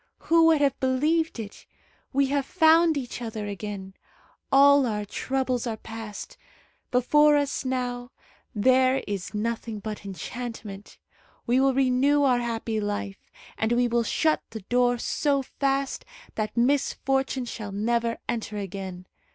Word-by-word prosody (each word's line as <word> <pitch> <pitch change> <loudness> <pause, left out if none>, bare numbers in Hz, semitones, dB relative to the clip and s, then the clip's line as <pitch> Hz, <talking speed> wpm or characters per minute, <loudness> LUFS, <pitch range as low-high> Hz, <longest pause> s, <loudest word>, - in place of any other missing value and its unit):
Who 330 0 +4
would 320 -3 +4
have 280 -2 +1
believed 300 +5 +1
it? 210 -3 -9 0.4
We 275 0 +2
have 280 -1 0
found 325 -2 +4
each 245 -2 -5
other 220 -3 -5
again. 200 -1 -6 0.6
All 280 -1 +6
our 210 -2 -2
troubles 255 +2 -2
are 225 -2 -3
past. 220 -2 -8 0.5
Before 295 +4 +4
us 285 -1 -1
now 245 -1 -2 0.5
there 255 +4 +3
is 200 0 -5
nothing 225 0 -3
but 215 0 -6
enchantment. 205 0 -7 0.5
We 245 +2 +2
will 270 -1 +3
renew 270 +2 +3
our 255 -3 +3
happy 230 -2 -2
life, 205 -1 -4 0.3
and 220 +2 +1
we 245 0 +3
will 235 0 +1
shut 310 +7 +1
the 220 - -7
door 245 +4 +2
so 280 +3 0
fast 275 +1 -2 0.3
that 215 +1 -4
misfortune 270 0 +1
shall 215 -3 -6
never 230 +3 0
enter 220 -2 -3
again. 190 -2 -6
245 Hz, 135 wpm, -26 LUFS, 215-275 Hz, 0.6 s, All